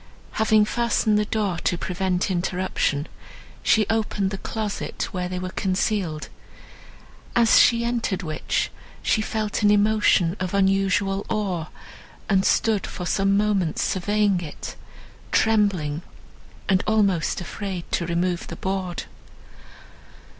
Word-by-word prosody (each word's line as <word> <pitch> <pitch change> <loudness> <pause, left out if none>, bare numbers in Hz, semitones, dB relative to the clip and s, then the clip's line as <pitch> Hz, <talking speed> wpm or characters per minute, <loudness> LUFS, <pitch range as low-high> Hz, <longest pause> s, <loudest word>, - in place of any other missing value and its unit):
Having 220 -1 +3
fastened 220 -2 +1
the 210 - +1
door 205 -5 -1
to 175 - 0
prevent 185 +2 -1
interruption, 180 -4 -1 0.5
she 215 -1 +3
opened 210 -3 0
the 195 - -4
closet 215 0 -3
where 180 -1 -2
they 180 - -3
were 185 0 -4
concealed, 185 -5 -1 1.1
as 235 -2 +6
she 235 0 +4
entered 230 -5 -1
which, 155 -2 -2 0.3
she 215 - +2
felt 215 -1 -2
an 205 - +5
emotion 205 -4 +3
of 185 +1 -2
unusual 195 0 +2
awe, 190 -7 -1 0.6
and 195 -2 +2
stood 220 -3 +2
for 180 - -6
some 195 +2 +2
moments 200 -6 +1
surveying 205 0 +1
it, 155 -4 -7 0.6
trembling, 195 -9 +2 0.7
and 190 -1 +3
almost 200 -6 +2
afraid 185 0 -5
to 170 - 0
remove 175 +1 -1
the - - -6
board. 190 -2 -3
195 Hz, 120 wpm, -24 LUFS, 180-210 Hz, 1.1 s, as